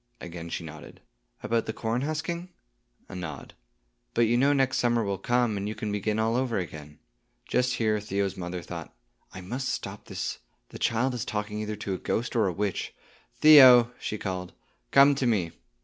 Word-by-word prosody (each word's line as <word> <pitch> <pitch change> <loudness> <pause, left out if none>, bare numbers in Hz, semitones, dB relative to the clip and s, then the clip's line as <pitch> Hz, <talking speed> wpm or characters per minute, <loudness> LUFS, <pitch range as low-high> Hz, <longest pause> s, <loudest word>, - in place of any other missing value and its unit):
Again 85 -1 -8
she 85 - -4
nodded. 80 -1 -11 0.4
"About 115 0 0
the 110 - -2
corn 115 +2 -2
husking?" 165 +4 -3 0.6
A - - -11
nod. 85 -6 -7 0.6
"But - - +3
you 115 0 +3
know 135 +4 +4
next 135 -2 +2
summer 120 -1 +2
will 100 -2 -2
come, 120 -1 +1
and 100 +1 -3
you 110 - -4
can 105 - -4
begin 105 +1 -1
all 110 +1 +1
over 125 -3 0
again." 75 -5 -6 0.5
Just 125 0 +1
here 110 -2 +1
Theo's 100 -2 -2
mother 90 -1 -5
thought, - - -8 0.4
"I 95 - -9
must 125 +9 -4
stop - - -5
this; - - -4 0.3
the - - -10
child 120 +3 +1
is 120 - -3
talking 105 0 -3
either 105 0 -3
to 100 -2 -4
a 95 - -4
ghost 120 +2 -2
or 110 -4 +3
a - - 0
witch. 100 +2 -3 0.5
Theo," 130 -6 +9
she 105 - -4
called, 90 -3 -5 0.4
"come 140 +1 +6
to 135 -2 0
me." 95 -8 +1
110 Hz, 185 wpm, -27 LUFS, 95-125 Hz, 0.6 s, Theo